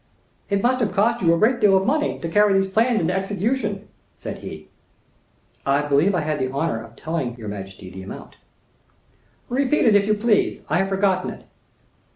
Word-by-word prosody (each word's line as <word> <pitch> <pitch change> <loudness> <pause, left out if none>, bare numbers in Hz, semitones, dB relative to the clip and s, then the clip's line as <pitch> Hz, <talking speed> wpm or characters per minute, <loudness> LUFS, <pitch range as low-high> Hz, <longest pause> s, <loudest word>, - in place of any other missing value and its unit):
"It 200 -1 0
must 255 +1 +2
have 225 -4 0
cost 230 +3 +2
you 170 -3 +4
a 170 - +3
great 235 +6 +2
deal 200 -3 +5
of 190 - 0
money 300 +4 0
to 165 - -3
carry 205 +4 +3
these 195 0 +3
plans 225 +4 +2
into 170 +2 0
execution," 205 +2 -2 0.3
said - - -7
he. - - -9 1.0
"I 140 +1 +1
believe 145 +7 +2
I 175 - +1
had 150 -1 -2
the 130 0 -1
honor 135 -5 -2
of 115 0 -15
telling 155 -6 -3
your 110 -3 -7
majesty 95 -2 -8
the 95 0 -9
amount." 95 - -10 1.1
"Repeat 270 +3 +1
it 220 -3 +5
if 200 0 +3
you 215 - +3
please, 210 0 +1
I - - +2
have 195 0 0
forgotten 195 -1 +1
it." - - -10
195 Hz, 195 wpm, -22 LUFS, 150-215 Hz, 1.1 s, deal